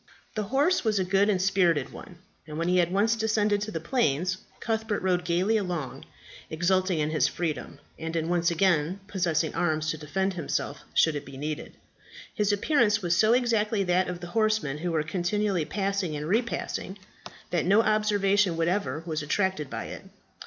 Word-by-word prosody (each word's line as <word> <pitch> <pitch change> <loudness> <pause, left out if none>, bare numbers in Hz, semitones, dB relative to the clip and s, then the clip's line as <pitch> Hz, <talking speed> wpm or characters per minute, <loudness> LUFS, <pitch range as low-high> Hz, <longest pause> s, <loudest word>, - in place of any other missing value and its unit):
The 215 -1 -2
horse 290 +8 +2
was 220 -3 +1
a 190 - +2
good 195 +3 +2
and 195 -3 +2
spirited 180 -6 +2
one, 180 - -11 0.3
and 150 0 -7
when 165 +1 -1
he 180 0 +3
had 175 0 +2
once 210 +4 +2
descended 215 -2 +1
to 210 - -3
the 165 - -3
plains, 180 - 0 0.2
Cuthbert 220 -2 -2
rode 180 -1 +1
gaily 180 +6 +1
along, 175 -9 -4 0.4
exulting 185 +2 +1
in 150 0 0
his 155 - +2
freedom, 160 -4 -4 0.2
and 160 +1 -4
in 165 -1 -1
once 175 -1 +2
again 170 0 +1
possessing 170 -6 0
arms 155 -2 0
to 155 - -6
defend 190 +6 -1
himself 170 -4 -3
should 160 -2 +4
it 145 - -4
be 135 -1 -11
needed. 150 +2 -5 0.6
His 210 -2 +1
appearance 215 -1 +2
was 170 -1 +2
so 215 +5 +4
exactly 225 -4 +1
that 185 0 +2
of 175 -1 -5
the 175 - -6
horsemen 215 -10 +1
who 175 +2 -2
were 160 -2 +1
continually 180 +1 -1
passing 195 -4 -2
and 150 +1 -4
repassing 215 -1 -2 0.5
that 170 -3 +1
no 205 +4 +5
observation 205 -4 +2
whatever 165 -3 -1
was 160 -2 -2
attracted 170 -1 -1
by - - -5
it. - - -7
185 Hz, 180 wpm, -27 LUFS, 165-210 Hz, 0.6 s, no